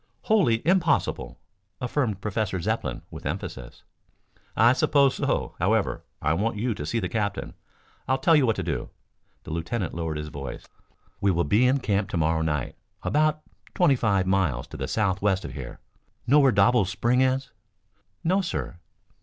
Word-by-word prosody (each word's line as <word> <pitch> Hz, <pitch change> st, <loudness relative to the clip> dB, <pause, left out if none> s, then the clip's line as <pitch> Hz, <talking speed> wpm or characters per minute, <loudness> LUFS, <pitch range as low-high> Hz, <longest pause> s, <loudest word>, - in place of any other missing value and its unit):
"Wholly 150 Hz, -, +2 dB
impossible," 180 Hz, -3 st, +1 dB, 0.4 s
affirmed 120 Hz, -6 st, -1 dB
Professor 105 Hz, -3 st, -2 dB
Zepplin -, -, -2 dB
with -, -, -9 dB
emphasis. -, -, -6 dB, 0.7 s
"I 115 Hz, +4 st, +6 dB
suppose 140 Hz, 0 st, +3 dB
so. -, -, -1 dB
However, -, -, +1 dB, 0.2 s
I 75 Hz, -, +2 dB
want 105 Hz, +5 st, -1 dB
you 115 Hz, +3 st, 0 dB
to 75 Hz, -7 st, -6 dB
see 115 Hz, -, 0 dB
the 90 Hz, -, -2 dB
captain. 100 Hz, +2 st, -2 dB, 0.5 s
I'll 130 Hz, +1 st, +2 dB
tell 160 Hz, +5 st, +4 dB
you 140 Hz, -4 st, +4 dB
what 110 Hz, -, +2 dB
to -, -, -3 dB
do." -, -, -3 dB, 0.5 s
The -, -, -9 dB
lieutenant 85 Hz, +4 st, -3 dB
lowered 80 Hz, -2 st, -3 dB
his 75 Hz, 0 st, -5 dB
voice. 70 Hz, -2 st, -7 dB, 0.5 s
"We 100 Hz, -, +2 dB
will 85 Hz, -2 st, +2 dB
be 105 Hz, +12 st, +3 dB
in 135 Hz, +2 st, +2 dB
camp 100 Hz, -4 st, 0 dB
to -, -, -2 dB
morrow 80 Hz, 0 st, +1 dB
night 75 Hz, -5 st, -2 dB, 0.3 s
about 155 Hz, +1 st, +1 dB, 0.3 s
twenty 175 Hz, -7 st, +4 dB
five 100 Hz, -6 st, +1 dB
miles 90 Hz, -10 st, +1 dB
to -, -, -9 dB
the -, -, -3 dB
southwest 95 Hz, -2 st, 0 dB
of -, -, -7 dB
here. 65 Hz, -5 st, -8 dB, 0.5 s
Know 140 Hz, +5 st, +5 dB
where 135 Hz, -2 st, +5 dB
Doble's 120 Hz, -6 st, +3 dB
Spring 120 Hz, +7 st, +1 dB
is?" 130 Hz, 0 st, +1 dB, 0.7 s
"No, 185 Hz, +4 st, +2 dB
sir." 130 Hz, -, -4 dB
105 Hz, 165 wpm, -26 LUFS, 85-130 Hz, 0.7 s, I